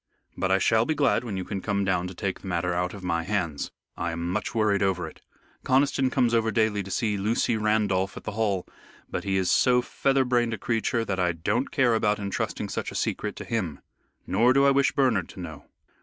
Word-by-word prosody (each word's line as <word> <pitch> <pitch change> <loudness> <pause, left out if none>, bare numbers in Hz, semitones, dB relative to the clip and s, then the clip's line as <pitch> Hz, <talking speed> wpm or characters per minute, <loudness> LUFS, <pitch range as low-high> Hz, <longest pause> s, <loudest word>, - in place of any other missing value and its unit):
But 95 - -1
I 95 - +4
shall 110 +3 +3
be 155 +6 -1
glad 140 -4 +2
when 105 -6 -4
you 95 - -2
can 95 0 -4
come 100 -1 0
down 90 -1 0
to 90 - -8
take 95 0 -3
the - - -9
matter 90 0 -1
out 90 +2 -1
of 100 - -10
my 85 -2 0
hands. 85 -5 -2 0.3
I 85 - -2
am 85 +1 -3
much 105 +3 -3
worried 105 -3 +2
over 95 -2 0
it. - - -13 0.4
Conniston 135 0 +2
comes 125 -3 +2
over 115 -1 +2
daily 110 -2 +1
to 95 - -8
see 105 +2 0
Lucy 110 +3 +1
Randolph 105 -3 +1
at - - -8
the 110 - -4
Hall, 100 -4 0 0.5
but - - -3
he 95 -1 +1
is 95 -1 +1
so 125 -1 +4
feather 135 +1 +1
brained 120 -2 +1
a - - -10
creature 115 0 0
that 95 -3 -2
I 90 -1 +2
don't 100 +10 -1
care 130 -5 +3
about 105 -2 +2
entrusting 100 -1 -3
such - - -3
a - - -9
secret - - -2
to - - -7
him. 90 -11 -2 0.5
Nor 115 +6 +3
do 140 +1 +4
I 140 - +6
wish 140 0 +3
Bernard 130 - +1
to - - -11
know. 80 -5 -8
105 Hz, 230 wpm, -26 LUFS, 95-115 Hz, 0.5 s, I